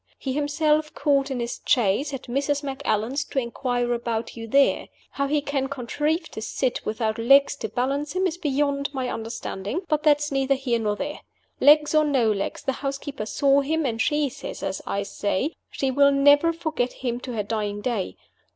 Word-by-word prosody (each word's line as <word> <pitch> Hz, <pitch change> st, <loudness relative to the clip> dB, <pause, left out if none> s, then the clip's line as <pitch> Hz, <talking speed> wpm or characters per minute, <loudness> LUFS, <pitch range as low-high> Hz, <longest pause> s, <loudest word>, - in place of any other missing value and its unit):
He 265 Hz, -, -3 dB
himself 300 Hz, +1 st, +1 dB
called 280 Hz, -2 st, +2 dB
in 265 Hz, -2 st, -3 dB
his 235 Hz, 0 st, -4 dB
chaise, 245 Hz, +3 st, +2 dB
at 270 Hz, -3 st, -5 dB
Mrs. 280 Hz, +3 st, -1 dB
Macallan's, 270 Hz, -1 st, -1 dB
to -, -, -9 dB
inquire 245 Hz, 0 st, 0 dB
about 235 Hz, -1 st, -3 dB
you 225 Hz, -1 st, -7 dB
there. 275 Hz, +5 st, +3 dB, 0.2 s
How 280 Hz, 0 st, -1 dB
he 295 Hz, +1 st, +1 dB
can 280 Hz, -2 st, -1 dB
contrive 295 Hz, +5 st, -2 dB
to 220 Hz, -, -7 dB
sit, 250 Hz, +3 st, -2 dB
without 220 Hz, 0 st, -2 dB
legs 275 Hz, +5 st, +5 dB
to 220 Hz, -, -4 dB
balance 275 Hz, +6 st, -1 dB
him, 370 Hz, +1 st, +1 dB
is 355 Hz, -1 st, -2 dB
beyond 280 Hz, -2 st, 0 dB
my 255 Hz, -2 st, -1 dB
understanding 225 Hz, -, -4 dB
but 305 Hz, -2 st, +1 dB
that 300 Hz, -2 st, +5 dB
is 295 Hz, 0 st, -4 dB
neither 270 Hz, 0 st, +2 dB
here 255 Hz, -3 st, -1 dB
nor 210 Hz, -2 st, 0 dB
there. 290 Hz, +7 st, -4 dB, 0.4 s
Legs 300 Hz, +1 st, +6 dB
or 310 Hz, 0 st, +5 dB
no 265 Hz, -7 st, +2 dB
legs, 200 Hz, -1 st, -3 dB
the 270 Hz, -, +1 dB
housekeeper 275 Hz, -4 st, -4 dB
saw 280 Hz, +3 st, +3 dB
him, 315 Hz, +2 st, 0 dB
and 225 Hz, -3 st, -1 dB
she 295 Hz, +2 st, +2 dB
says, -, -, -8 dB
as -, -, -3 dB
I 200 Hz, -, -1 dB
say, 205 Hz, -, -1 dB, 0.2 s
she 270 Hz, -1 st, -1 dB
will 280 Hz, +1 st, +5 dB
never 285 Hz, +4 st, +5 dB
forget 315 Hz, -7 st, -2 dB
him 240 Hz, 0 st, -1 dB
to 250 Hz, -1 st, -6 dB
her 215 Hz, -2 st, -1 dB
dying 205 Hz, -1 st, -2 dB
day. 210 Hz, -4 st, -2 dB
275 Hz, 190 wpm, -24 LUFS, 235-290 Hz, 0.4 s, Legs